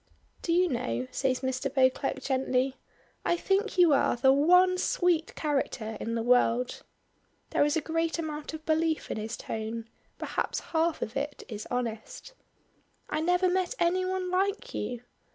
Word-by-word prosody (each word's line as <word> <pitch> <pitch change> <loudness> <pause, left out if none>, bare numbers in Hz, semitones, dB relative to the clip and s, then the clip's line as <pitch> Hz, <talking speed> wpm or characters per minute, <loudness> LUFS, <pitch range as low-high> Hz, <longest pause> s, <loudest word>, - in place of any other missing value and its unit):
"Do 335 - -2
you 360 +2 +4
know," 125 - -2
says 260 -2 0
Mr. 260 0 -2
Beauclerk, 265 0 +1
gently, 260 0 0 0.5
"I 345 - +1
think 390 +3 0
you 345 -4 +6
are 275 - +3
the 265 +2 +5
one 360 +6 +5
sweet 350 -3 +1
character 265 -7 -2
in 230 +1 -3
the 230 - -1
world." 245 0 +2 0.7
There - - +3
is 295 +2 +2
a - - 0
great 330 +2 -1
amount 310 -1 -4
of 315 0 -11
belief 320 0 0
in - - -2
his 220 +2 -4
tone, 225 +1 -5 0.3
perhaps - - -2
half 325 0 +1
of 220 - -6
it 285 +1 -3
is 215 -2 -7
honest. 245 - -4 0.8
"I 305 - 0
never 360 +3 +3
met 370 +5 0
any 355 +2 +2
one 370 0 -2
like 400 +6 0
you. 245 -2 -3
295 Hz, 160 wpm, -29 LUFS, 250-350 Hz, 0.8 s, you